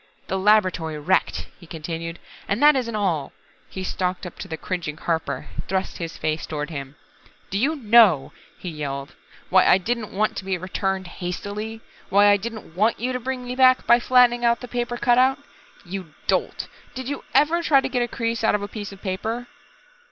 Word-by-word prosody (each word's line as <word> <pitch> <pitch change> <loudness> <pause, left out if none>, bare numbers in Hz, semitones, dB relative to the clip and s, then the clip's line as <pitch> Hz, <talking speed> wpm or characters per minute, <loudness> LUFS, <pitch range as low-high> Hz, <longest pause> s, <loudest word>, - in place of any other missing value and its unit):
"The 190 - 0
laboratory 185 -6 +2
wrecked," 175 +6 +1
he 170 - -14
continued, 165 +1 -5 0.3
"and 200 - 0
that 295 0 +7
isn't 235 -4 -1
all!" 175 -9 -1 0.4
He 190 - -6
stalked 185 +1 -2
up 180 - -9
to - - -6
the 160 -3 -5
cringing 160 -3 -4
Harper, 165 -1 -2 0.2
thrust 190 0 -2
his 165 -1 -5
face 155 0 -2
toward 150 0 -4
him. 140 -2 -6 0.6
"Do 195 - 0
you 290 +8 +2
know," 220 - +5 0.2
he 180 - -6
yelled, 140 -2 -5 0.4
"why 185 0 +6
I - - +7
didn't 220 +3 -3
want 215 +3 0
to - - -4
be 190 -1 -1
returned 190 +1 -2
hastily 205 +5 -5 0.3
why 205 +1 +6
I 205 - +6
didn't 220 -5 -7
want 215 +4 +2
you 250 +3 -1
to 250 - -2
bring 255 0 -4
me 250 0 -4
back 255 0 +5
by 235 - +6
flattening 245 -1 +4
out 235 0 +3
the 250 - -7
paper 240 0 -2
cutout? 255 +2 +4 0.5
You 180 -4 -7
dolt, - - 0 0.3
did 260 -1 -5
you 285 0 -4
ever 325 +4 +4
try 295 -4 +5
to - - -1
get 250 - -1
a 240 - +1
crease 230 -1 -2
out 220 - +4
of 205 - -2
a - - -3
piece 205 -1 -7
of 195 0 -13
paper?" 220 +5 -3
200 Hz, 195 wpm, -23 LUFS, 175-240 Hz, 0.6 s, that